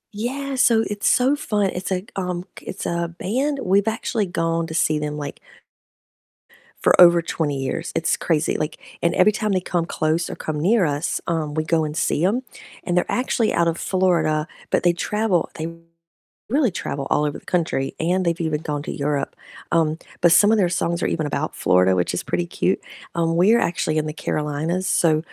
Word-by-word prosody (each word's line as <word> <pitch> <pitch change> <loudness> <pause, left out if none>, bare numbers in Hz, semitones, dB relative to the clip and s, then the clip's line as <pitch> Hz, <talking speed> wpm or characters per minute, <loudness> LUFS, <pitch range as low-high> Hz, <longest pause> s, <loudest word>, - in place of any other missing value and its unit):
Yeah, 270 +5 -3
so 230 -3 +4
it's 205 0 -1
so 260 +3 +4
fun, 205 -8 0
it's 180 +2 -4
like, 185 +2 -3
um, 180 -1 -3 0.2
it's - - -6
a 170 0 -1
band. 275 +8 -1
We've 200 +3 +2
actually 220 -2 -1
gone 165 -1 -1
to 160 - -6
see 155 -1 +2
them 150 0 -3
like 145 - -6 1.4
for - - +4
over 170 -1 +8
20 150 -4 -2
years. 165 +5 -3
It's 160 - +1
crazy, 160 -2 0
like, 150 0 -3 0.2
and 170 0 +1
every 200 +4 +5
time 215 -1 -1
they 185 - +1
come 175 -2 -1
close 160 +1 -1
or - - -5
come 150 -1 -4
near 200 +6 +3
us, 145 0 -1
um, 160 -3 -1
we 155 0 0
go 160 -1 +1
and 150 0 -5
see 165 0 +1
'em, 230 +7 +1 0.4
and 175 -1 -1
they're 180 - +3
actually 245 -3 0
out 170 0 +3
of 165 - -3
Florida, 165 -5 +1 0.2
but - - +1
they 175 - +5
travel. 200 0 0
They 160 +1 -4 0.8
really 265 -5 +2
travel 140 -5 -4
all 150 - +2
over 150 - -3
the - - -30
country, 160 -6 -1
and 180 +3 +1
they've 170 0 0
even 155 -2 -1
gone 145 -1 -3
to - - -5
Europe, 145 -1 -2 0.4
um, 160 -2 +2 0.2
but 175 -1 +5
some 205 +5 +6
of 225 - +4
their 190 - +3
songs 170 -1 -1
are - - +2
even 155 - -1
about 145 +1 -2
Florida, 90 +1 +3
which 90 -1 0
is - - -1
pretty 175 - -1
cute. 185 +2 -1 0.3
Um, 165 0 +1
we're 215 +7 +5
actually 155 -2 0
in 155 - +1
the 155 - -4
Carolinas, 155 +5 -2
so, 155 -3 +3
170 Hz, 200 wpm, -22 LUFS, 155-190 Hz, 1.4 s, over